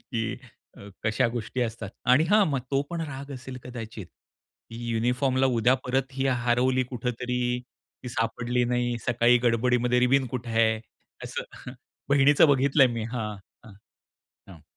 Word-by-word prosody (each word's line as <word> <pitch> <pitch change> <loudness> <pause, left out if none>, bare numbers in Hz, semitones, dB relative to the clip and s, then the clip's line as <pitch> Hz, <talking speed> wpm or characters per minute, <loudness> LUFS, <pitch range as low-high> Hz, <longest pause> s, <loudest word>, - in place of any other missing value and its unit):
की 115 -1 -1 0.4
अ, 100 - -11 0.2
कशा 110 +1 +2
गोष्टी 120 +2 -4
असतात 110 -4 -4 0.2
आणि 145 +5 +5
हां, 210 0 +6
मग 140 -3 -1
तो 140 0 +2
पण 170 -1 -3
राग 140 -3 -6
असेल 130 0 -8
कदाचित, 115 -5 -8 0.6
की 115 - -8
युनिफॉर्मला 125 +3 +1
उद्या 125 0 +3
परत 130 +1 -1
ही 135 +1 -1
हरवली 125 +1 +2
कुठेतरी, 125 0 -2 0.4
ती 125 - -6
सापडली 120 +1 -1
नाही, 120 0 0
सकाळी 120 0 +4
गडबडीमध्ये 125 +1 +2
रिबिन 130 +2 +3
कुठे 120 -1 -4
आहे? 110 -1 +2 0.4
असं - - -7 0.4
बहिणीचं 140 +2 +6
बघितलंय 135 0 +4
मी, 115 -1 -3
हां. 110 -4 -3 0.3
हं, 105 - -13 0.7
हं. 85 -5 -13
125 Hz, 140 wpm, -26 LUFS, 115-130 Hz, 0.7 s, हां